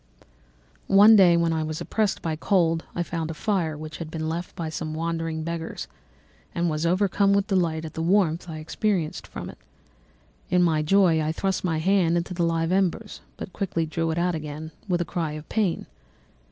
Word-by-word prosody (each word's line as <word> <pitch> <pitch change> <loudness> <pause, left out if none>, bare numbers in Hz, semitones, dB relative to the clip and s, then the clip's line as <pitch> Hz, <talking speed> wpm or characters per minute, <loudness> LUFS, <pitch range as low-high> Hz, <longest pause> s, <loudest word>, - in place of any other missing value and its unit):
"One 205 +3 +8
day, 180 -4 +6
when 170 -1 +2
I 160 - 0
was 155 0 -3
oppressed 215 -3 -1
by 160 -2 -1
cold, 165 -1 +1
I 175 - 0
found 165 -2 -4
a 165 - -5
fire 165 -4 -1
which 155 -1 -7
had 165 -2 -6
been 160 -1 -4
left 170 +2 -4
by 165 - -4
some 155 0 -4
wandering 165 -1 -2
beggars, 165 0 -5 0.7
and 170 -1 +1
was 155 +2 -1
overcome 200 +2 +2
with 200 -1 +2
delight 170 -6 0
at 155 - -8
the 160 - -4
warmth 175 -1 +2
I 160 - -5
experienced 165 +1 -2
from - - -7
it. - - -11 0.9
In 180 0 +3
my 160 -3 +2
joy 170 0 +4
I 155 0 0
thrust 190 +4 -1
my 165 -3 0
hand 175 0 +2
into 170 +2 -3
the 175 - -3
live 165 0 +1
embers, 195 +3 0 0.2
but 185 - -7
quickly 170 -5 -1
drew 165 +1 -2
it 160 - -2
out 175 +1 +1
again 155 0 -6 0.2
with 175 -1 +1
a - - -1
cry 165 -3 -3
of 155 0 -8
pain. 205 -6 0
165 Hz, 195 wpm, -25 LUFS, 160-185 Hz, 0.9 s, One